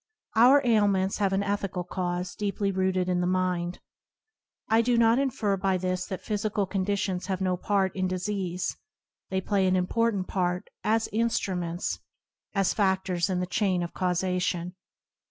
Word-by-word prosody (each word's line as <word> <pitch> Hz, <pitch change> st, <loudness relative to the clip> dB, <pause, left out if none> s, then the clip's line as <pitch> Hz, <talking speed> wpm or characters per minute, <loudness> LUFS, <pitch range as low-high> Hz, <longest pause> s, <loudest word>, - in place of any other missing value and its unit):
Our 255 Hz, +5 st, +7 dB
ailments 200 Hz, -4 st, +2 dB
have 200 Hz, -2 st, +2 dB
an 195 Hz, +1 st, +1 dB
ethical 200 Hz, -3 st, -2 dB
cause 180 Hz, 0 st, -3 dB
deeply 200 Hz, -1 st, -1 dB
rooted 185 Hz, -1 st, 0 dB
in 180 Hz, -1 st, +1 dB
the 180 Hz, -, +1 dB
mind. 180 Hz, -1 st, 0 dB, 0.9 s
I 225 Hz, +1 st, +4 dB
do 240 Hz, +1 st, +2 dB
not 230 Hz, +2 st, +5 dB
infer 220 Hz, -7 st, 0 dB
by 190 Hz, 0 st, +1 dB
this 185 Hz, 0 st, -2 dB
that 190 Hz, -, -5 dB
physical 210 Hz, -1 st, -1 dB
conditions 190 Hz, -1 st, -1 dB
have 190 Hz, -2 st, -1 dB
no 185 Hz, -1 st, +1 dB
part 190 Hz, +1 st, 0 dB
in 185 Hz, -1 st, 0 dB
disease; 185 Hz, -1 st, -2 dB, 0.5 s
they 190 Hz, 0 st, 0 dB
play 195 Hz, 0 st, +1 dB
an 185 Hz, -, +3 dB
important 195 Hz, +1 st, +1 dB
part 180 Hz, -1 st, -1 dB
as 225 Hz, +1 st, +2 dB
instruments, 185 Hz, -6 st, -1 dB, 0.6 s
as 195 Hz, -2 st, +2 dB
fa&ors 190 Hz, -3 st, +1 dB
in 180 Hz, -1 st, 0 dB
the -, -, 0 dB
chain 185 Hz, -1 st, 0 dB
of 170 Hz, -, -6 dB
causation. 180 Hz, -1 st, -1 dB
190 Hz, 155 wpm, -27 LUFS, 180-205 Hz, 0.9 s, Our